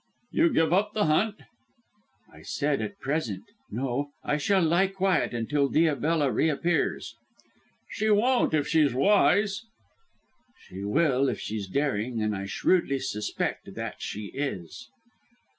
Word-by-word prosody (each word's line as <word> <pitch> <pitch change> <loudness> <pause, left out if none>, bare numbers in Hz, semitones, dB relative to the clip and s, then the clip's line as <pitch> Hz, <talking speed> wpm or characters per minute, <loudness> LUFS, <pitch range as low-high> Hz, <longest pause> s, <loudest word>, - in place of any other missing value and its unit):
"You 330 0 +3
give 165 - +2
up 210 +3 +2
the 210 - +2
hunt?" 200 +8 +2 1.0
"I - - -14
said, 145 -1 -1
at 200 - -5
present. 135 -8 -2 0.3
No. 130 +4 -2
I 150 - 0
shall 190 +5 +2
lie 170 +4 +3
quiet 195 -2 0
until 140 +4 0
Diabella 155 -2 +2
reappears." 160 +2 0 0.8
"She 220 - -1
won't, 225 -3 +3
if 150 - 0
she's 150 -6 +3
wise." 205 +5 +3 1.0
"She 95 +2 -9
will 135 +3 +2
if - - -3
she's 105 -2 -4
daring, 120 -1 -1
and 105 -1 0
I 100 0 -5
shrewdly 140 - +1
suspect 130 -6 -3
that - - -5
she 105 -1 -5
is." 100 - -5
150 Hz, 130 wpm, -27 LUFS, 125-185 Hz, 1.0 s, You